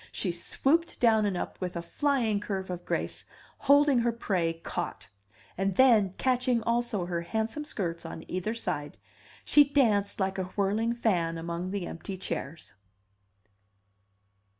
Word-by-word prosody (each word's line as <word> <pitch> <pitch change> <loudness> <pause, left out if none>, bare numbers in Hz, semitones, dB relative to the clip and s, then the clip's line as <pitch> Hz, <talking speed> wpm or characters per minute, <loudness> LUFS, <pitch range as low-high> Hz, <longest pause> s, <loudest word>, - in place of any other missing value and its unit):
She 185 - -2
swooped 280 - 0
down 220 -3 +4
and 190 -3 -1
up - - -5
with 180 -1 -3
a 170 - -2
flying 235 0 +1
curve 190 -3 -4
of 175 -1 -6
grace, - - -2 0.4
holding 285 -2 +5
her 235 0 +2
prey 185 -7 -1
caught; 165 - -5 0.5
and 195 -1 0
then, 215 -7 +5
catching 250 -2 +1
also 235 -5 0
her 175 -1 -2
handsome 220 - -2
skirts 170 - -3
on 165 -1 -7
either 185 +5 -2
side, 150 -10 -3 0.5
she 295 - +7
danced 230 -10 +2
like 190 0 -1
a 185 - -1
whirling 215 +4 +1
fan 175 -8 0
among 170 +2 -4
the 195 -2 -3
empty 190 +4 -6
chairs. 165 -4 -5
200 Hz, 145 wpm, -29 LUFS, 175-235 Hz, 0.5 s, she